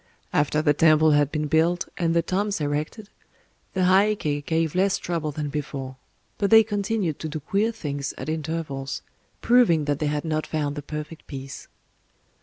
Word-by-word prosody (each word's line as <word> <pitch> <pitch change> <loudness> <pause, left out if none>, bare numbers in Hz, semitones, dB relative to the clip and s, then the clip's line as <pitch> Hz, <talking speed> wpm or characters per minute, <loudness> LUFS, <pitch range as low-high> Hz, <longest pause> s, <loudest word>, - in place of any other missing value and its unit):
After 150 +1 +2
the 145 -2 +4
temple 155 +1 +5
had 145 -1 +3
been 150 -1 -1
built, 165 +4 +2
and 165 -1 0
the 170 - +3
tombs 200 +3 -1
erected, 150 +8 -3 0.7
the 185 - +1
Heiké 185 -6 +2
gave 160 0 0
less 190 +1 +2
trouble 165 -3 -3
than 150 0 -4
before; 140 -3 -5 0.4
but 200 - +1
they 225 0 +8
continued 205 -5 -1
to 155 - -4
do 155 +1 -4
queer 205 +9 0
things 145 -10 -4
at - - -6
intervals,—proving 160 - 0
that 145 -1 -1
they 155 - 0
had 150 +1 -2
not 155 -1 -1
found 145 -2 -2
the 145 - -4
perfect 150 +2 -7
peace. 135 -1 -8
155 Hz, 165 wpm, -24 LUFS, 145-180 Hz, 0.7 s, they